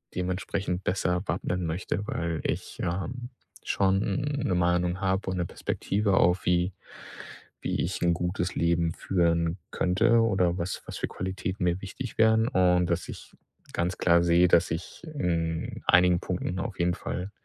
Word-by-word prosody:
dementsprechend 90 0 -2
besser 90 -1 0
wappnen 90 0 -1
möchte, 90 +4 -3
weil 85 -1 -2
ich, - - -3
ähm, 120 +8 -3 0.4
schon 95 -1 +2 0.4
'ne 90 - +1
Meinung 90 +1 +1
habe 95 0 0
und 95 - -2
'ne 85 -1 -1
Perspektive 100 +3 -1
auf, 90 -1 +3
wie 90 +1 +2 0.9
wie - - -1
ich 90 +1 -2
'n 85 - +4
gutes 90 +1 -2
Leben 85 0 +1
führen 85 -1 +1
könnte 115 +6 +3
oder 95 -5 +2
was 85 +2 -3
was - - -7
für - - -1
Qualitäten 95 +1 -4
mir 90 +1 +1
wichtig 110 +5 -7
wären. 110 +1 +5
Und, 90 -3 +3
dass 85 0 -2
ich - - -10 0.4
ganz 90 +1 -1
klar 85 -1 +4
sehe, 85 +1 +5
dass 85 +1 +4
ich 80 - -6
in 85 - -2
einigen 90 0 +5
Punkten 90 0 -3
auf 95 -1 -4
jeden 85 0 +1
Fall 90 +2 -5
90 Hz, 155 wpm, -27 LUFS, 85-95 Hz, 0.9 s, wären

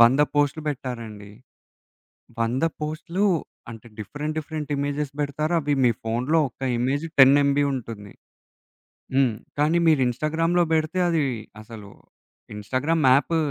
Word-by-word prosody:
100 120 +5 +6
పోస్టులు 145 +1 +1
పెట్టారండి. 115 -7 -6 1.1
100 120 +6 0 0.2
పోస్టులు 165 +6 -2 0.4
అంటే 115 +1 -11
డిఫరెంట్ 150 +8 -5
డిఫరెంట్ 155 -1 -5
ఇమేజెస్ 145 0 -2
పెడతారు. 150 +3 -2
అవి 145 -1 -1
మీ 120 - +5
ఫోనులో 125 +8 +1
ఒక్క 130 - -34 0.2
ఇమేజ్ 135 +6 -1
10 135 +1 +8
ఎంబీ 140 +1 +2
ఉంటుంది. 110 -5 -7 1.0
హ్మ్. 130 -4 +3 0.3
కానీ 155 +3 +3
మీరు 155 -4 +4
ఇన్‌స్టాగ్రామ్‌లో 165 +7 +1
పెడితే 160 +3 0
అది 165 -3 +1 0.4
అసలు 110 -2 -11 0.7
ఇన్‌స్టాగ్రామ్‌ 135 +9 -1
యాప్ 145 +5 +2
140 Hz, 120 wpm, -24 LUFS, 120-155 Hz, 1.1 s, 10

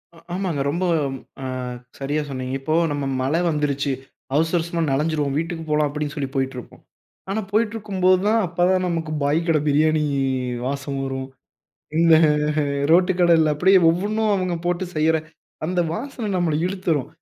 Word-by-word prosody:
அ - - -17 0.2
ஆமாங்க. 180 -7 -1
ரொம்ப 175 +4 -2 0.6
அ - - -4 0.5
சரியா 145 +3 -1
சொன்னீங்க. 130 -1 -4
இப்போ 155 +4 -2 0.2
நம்ம 145 -1 -2 0.2
மழை 145 +6 +1
வந்துருச்சு. 145 -2 0 0.4
அவசர, 165 +3 +2
அவசரமா 170 0 -3
நனஞ்சிருவோம் 145 0 0
வீட்டுக்கு 165 0 -3
போலாம் 150 -1 +2
அப்பிடின்னு 150 0 -4
சொல்லி 140 -3 -3
போயிட்டு 135 0 -1
இருப்போம். 125 - -10 0.5
ஆனா, 210 +3 -1
போயிட்டிருக்கும்போது 205 -4 +2
தான் 225 +2 +3
அப்ப 170 - -16
தான் 185 -1 +2
நமக்கு 165 -2 -2
பாய் 145 +3 +2
கடை 160 -2 +3
பிரியாணி 155 +2 +3 0.6
வாசம் 140 +1 -3
வரும். 135 0 -4 0.7
இந்த 165 -1 +6 0.8
ரோட்டு 180 +2 +5
கடையில 165 -3 +4
அப்பிடியே 190 +6 +5
ஒவ்வொன்னும் 210 +5 0
அவுங்க 185 -2 -1
போட்டு 175 +1 0
செய்ற 160 +1 +3 0.5
அந்த 180 +1 0
வாசனை 240 0 -5
நம்மள 175 -4 +1
இழுத்துரும். 180 -7 -1
160 Hz, 145 wpm, -22 LUFS, 145-185 Hz, 0.8 s, இந்த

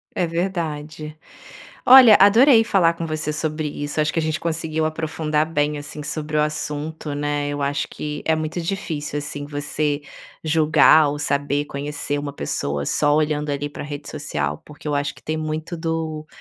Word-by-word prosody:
É 180 - +1
verdade. 155 -3 -3 0.7
Olha, 250 -4 +10
adorei 225 +5 +7
falar 190 -7 +3
com 170 0 -5
você 155 -1 -2
sobre 155 0 -2
isso. 145 +1 -3
Acho 150 - -1
que - - -1
a - - +1
gente 155 0 -1
conseguiu 160 -1 -2
aprofundar 155 -1 -1
bem 150 -2 0
assim 150 +1 -8
sobre 150 +1 -4
o 150 - +4
assunto, 150 0 -4
né. 145 0 -1
Eu 145 0 -3
acho 140 0 -1
que 150 -1 -5
é 160 - +3
muito 155 +2 -3
difícil, 165 -5 -3
assim, 145 -1 -5
você 145 0 -2 0.4
julgar 155 -1 +5
ou 145 +1 -3
saber 145 0 0
conhecer 145 0 -4
uma 145 -1 -5
pessoa 70 - -2
só 145 - +2
olhando 150 -1 0
ali 145 +1 -2
pra - - -7
rede 145 0 -7
social, 75 - -3
porque 150 +1 -13
eu 150 - 0
acho 145 0 -1
que - - -18
tem 155 0 -3
muito 155 +2 -4
do 160 -2 -3
150 Hz, 175 wpm, -22 LUFS, 145-160 Hz, 0.7 s, Olha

